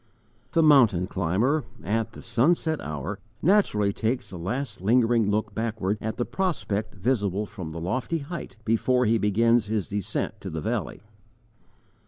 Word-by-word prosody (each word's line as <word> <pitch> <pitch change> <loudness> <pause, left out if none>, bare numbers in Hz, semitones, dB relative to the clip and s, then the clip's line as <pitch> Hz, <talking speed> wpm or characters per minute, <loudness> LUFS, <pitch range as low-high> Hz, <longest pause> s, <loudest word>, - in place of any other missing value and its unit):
THE 165 -2 +4
mountain 120 - +5
climber, 100 - +1 0.2
at 110 +3 -1
the - - -11
sunset 155 +7 +1
hour, 75 +7 -5 0.2
naturally 125 - +3
takes 115 +5 -2
a 90 - -6
last 110 +5 -4
lingering 115 0 +3
look 105 0 -1
backward 110 -2 -2
at 110 +1 -3
the 120 - 0
prospect 110 - -2
visible 105 -2 0
from 90 -6 -7
the 85 - -6
lofty 130 - -1
height, 155 -3 -7
before 125 +3 +2
he 115 +1 +3
begins 115 +2 +3
his 105 -4 -2
descent 100 -1 -3
to - - -5
the 80 - -4
valley. 80 - -3
110 Hz, 150 wpm, -26 LUFS, 100-125 Hz, 0.2 s, mountain